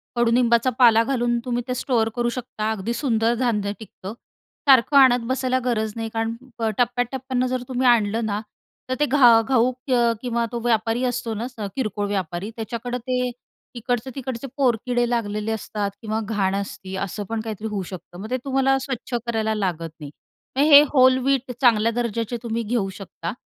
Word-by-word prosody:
कडूनिंबाचा 235 Hz, 0 st, +3 dB
पाला 230 Hz, -1 st, +7 dB
घालून 240 Hz, -2 st, 0 dB
तुम्ही 245 Hz, -1 st, -1 dB
ते 250 Hz, -, -1 dB
स्टोअर 225 Hz, -4 st, +1 dB
करू 240 Hz, 0 st, 0 dB
शकता. 220 Hz, -3 st, -3 dB
अगदी 220 Hz, +2 st, -3 dB
सुंदर 235 Hz, -3 st, +1 dB
धान्य 210 Hz, -5 st, 0 dB
टिकतं. 200 Hz, -1 st, -9 dB, 0.5 s
सारखं 270 Hz, +2 st, +6 dB
आणत 250 Hz, -3 st, +6 dB
बसायला 260 Hz, 0 st, 0 dB
गरज 220 Hz, -3 st, 0 dB
नाही 225 Hz, -1 st, -4 dB
कारण 225 Hz, 0 st, -1 dB, 0.2 s
प 225 Hz, -1 st, -1 dB
टप्प्या-टप्प्याने 250 Hz, +1 st, 0 dB
जर 255 Hz, 0 st, -2 dB
तुम्ही 255 Hz, 0 st, 0 dB
आणलं 225 Hz, -1 st, +3 dB
ना, 205 Hz, -1 st, -1 dB, 0.5 s
तर 255 Hz, -, 0 dB
ते 295 Hz, -, +4 dB
घा 260 Hz, -4 st, +6 dB
घाऊक 255 Hz, +2 st, 0 dB
अ, 240 Hz, -2 st, +4 dB
किंवा 235 Hz, -2 st, -1 dB
तो 240 Hz, -, -3 dB
व्यापारी 225 Hz, +2 st, +1 dB
असतो 235 Hz, -2 st, -3 dB
ना, 220 Hz, +3 st, -4 dB, 0.3 s
किरकोळ 210 Hz, -5 st, -2 dB
व्यापारी 190 Hz, 0 st, -3 dB
त्याच्याकडं 235 Hz, +2 st, -4 dB
ते 255 Hz, 0 st, +1 dB, 0.6 s
इकडचे-तिकडचे 250 Hz, +1 st, -3 dB
पोरकिडे 245 Hz, -1 st, +1 dB
लागलेले 215 Hz, -2 st, -1 dB
असतात 210 Hz, -2 st, -3 dB
किंवा 220 Hz, 0 st, -2 dB
घाण 195 Hz, -2 st, +1 dB
असती. 190 Hz, -1 st, -5 dB
असं 205 Hz, +2 st, -5 dB
पण 225 Hz, -1 st, -2 dB
काहीतरी 220 Hz, -1 st, -5 dB
होऊ 200 Hz, -2 st, -2 dB
शकतं. 175 Hz, 0 st, -10 dB
मग 215 Hz, +4 st, -7 dB
ते 255 Hz, -, +1 dB
तुम्हाला 270 Hz, 0 st, +2 dB
स्वच्छ 250 Hz, -1 st, -5 dB
करायला 220 Hz, -2 st, -1 dB
लागत 175 Hz, -5 st, -2 dB
नाही. 145 Hz, -2 st, -8 dB, 0.5 s
मग -, -, +4 dB
हे 285 Hz, 0 st, +11 dB
व्होल 260 Hz, -3 st, +4 dB
व्हीट 270 Hz, -2 st, +1 dB
चांगल्या 230 Hz, -3 st, +4 dB
दर्जाचे 235 Hz, 0 st, -2 dB
तुम्ही 230 Hz, 0 st, -2 dB
घेऊ 215 Hz, -3 st, -1 dB
शकता 175 Hz, -4 st, -6 dB
235 Hz, 170 wpm, -23 LUFS, 215-250 Hz, 0.6 s, हे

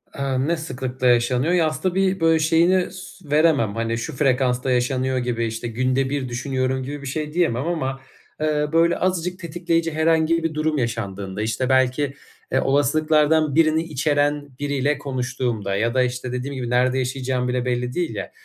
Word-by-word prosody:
Iıı, 135 Hz, 0 st, -1 dB
ne 170 Hz, 0 st, +1 dB
sıklıkla 130 Hz, -4 st, -3 dB
yaşanıyor? 125 Hz, +6 st, +2 dB
Ya, 165 Hz, -3 st, +3 dB
aslında 170 Hz, +4 st, -1 dB
tabii, 190 Hz, +1 st, +1 dB
böyle, 165 Hz, -1 st, +3 dB
şeyini 170 Hz, +4 st, +3 dB
s 185 Hz, -3 st, -12 dB
veremem, 150 Hz, -9 st, +3 dB
hani, 115 Hz, 0 st, -1 dB
şu 135 Hz, +5 st, -5 dB
frekansta 130 Hz, -2 st, +1 dB
yaşanıyor 130 Hz, +1 st, 0 dB
gibi, 120 Hz, -2 st, -1 dB
işte, 115 Hz, +1 st, -4 dB
günde 130 Hz, +3 st, 0 dB
bir 140 Hz, -3 st, -2 dB
düşünüyorum 130 Hz, +1 st, -1 dB
gibi 145 Hz, +2 st, -6 dB
bir 140 Hz, -, -7 dB
şey 150 Hz, +2 st, -4 dB
diyemem 160 Hz, -5 st, +1 dB
ama, 135 Hz, -6 st, -2 dB, 0.4 s
eee, 150 Hz, -1 st, +1 dB
böyle, 165 Hz, +1 st, +3 dB
azıcık 180 Hz, 0 st, -1 dB
tetikleyici 165 Hz, -1 st, -1 dB
herhangi 160 Hz, +1 st, +2 dB
bir 165 Hz, -1 st, -1 dB
durum 155 Hz, 0 st, 0 dB
yaşandığında, 100 Hz, -4 st, -3 dB, 0.3 s
belki, 130 Hz, +1 st, +2 dB, 0.4 s
eee, 130 Hz, -, +2 dB
olasılıklardan 155 Hz, +1 st, +2 dB
birini 160 Hz, 0 st, +3 dB
içeren 145 Hz, -1 st, 0 dB
biriyle 145 Hz, 0 st, 0 dB
konuştuğumda 125 Hz, -6 st, -2 dB
ya 115 Hz, +4 st, 0 dB
da 130 Hz, -, +3 dB
işte 125 Hz, 0 st, -3 dB
dediğim 130 Hz, +2 st, -4 dB
gibi 125 Hz, -2 st, -4 dB
nerede 125 Hz, +1 st, +2 dB
yaşayacağım 130 Hz, -1 st, -1 dB
bile 125 Hz, 0 st, -1 dB
belli 125 Hz, 0 st, -1 dB
değil 170 Hz, -11 st, -2 dB
ya, 100 Hz, -, -5 dB
135 Hz, 165 wpm, -22 LUFS, 125-160 Hz, 0.4 s, Ya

